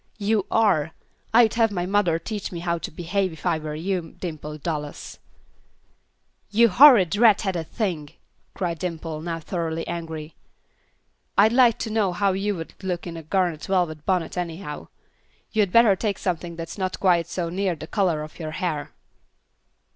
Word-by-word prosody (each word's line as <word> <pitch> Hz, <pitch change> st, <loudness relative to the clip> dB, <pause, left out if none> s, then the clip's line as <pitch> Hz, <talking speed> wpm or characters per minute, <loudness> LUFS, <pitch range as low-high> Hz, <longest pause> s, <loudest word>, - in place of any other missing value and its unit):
"You 210 Hz, -1 st, 0 dB
are. 175 Hz, -9 st, +2 dB, 0.4 s
I'd 225 Hz, -1 st, +5 dB
have 225 Hz, -2 st, +3 dB
my 175 Hz, -3 st, -2 dB
mother 185 Hz, -4 st, +2 dB
teach 205 Hz, +4 st, -5 dB
me 170 Hz, -2 st, -5 dB
how 170 Hz, -1 st, -1 dB
to -, -, -5 dB
behave, 180 Hz, +3 st, -1 dB
if 160 Hz, -, -12 dB
I 170 Hz, -3 st, +1 dB
were 155 Hz, -1 st, -5 dB
you, 175 Hz, +1 st, -3 dB
Dimple 155 Hz, -3 st, -6 dB
Dallas." 150 Hz, -2 st, -5 dB, 1.3 s
"You 230 Hz, +3 st, +5 dB
horrid, 210 Hz, -, +7 dB
red 220 Hz, -3 st, +5 dB
headed 180 Hz, -6 st, -2 dB
thing!" 170 Hz, -10 st, -3 dB, 0.5 s
cried 170 Hz, -4 st, -2 dB
Dimple, 165 Hz, -3 st, -4 dB
now 165 Hz, 0 st, -3 dB
thoroughly 165 Hz, -1 st, -3 dB
angry. 160 Hz, -2 st, -5 dB, 1.0 s
"I'd 215 Hz, +3 st, +6 dB
like 245 Hz, -2 st, +5 dB
to 225 Hz, -, -4 dB
know 210 Hz, -4 st, +1 dB
how 200 Hz, +2 st, +2 dB
you 200 Hz, +2 st, -1 dB
would 165 Hz, -2 st, -7 dB
look 180 Hz, -2 st, -3 dB
in 170 Hz, -2 st, -6 dB
a 165 Hz, -, -6 dB
garnet 170 Hz, -1 st, -1 dB
velvet 175 Hz, -6 st, 0 dB
bonnet 180 Hz, -2 st, 0 dB
anyhow. 165 Hz, -3 st, -5 dB, 0.6 s
You'd 210 Hz, -4 st, +1 dB
better 230 Hz, -3 st, +6 dB
take 200 Hz, 0 st, -2 dB
something 175 Hz, -2 st, -3 dB
that's 165 Hz, +4 st, -7 dB
not 185 Hz, -1 st, -2 dB
quite 175 Hz, -3 st, +3 dB
so 170 Hz, -2 st, -3 dB
near 185 Hz, 0 st, -1 dB
the 155 Hz, -, -8 dB
color 175 Hz, -4 st, 0 dB
of 155 Hz, -, -11 dB
your 155 Hz, -2 st, -5 dB
hair." 170 Hz, -6 st, -2 dB
180 Hz, 165 wpm, -24 LUFS, 165-200 Hz, 1.3 s, horrid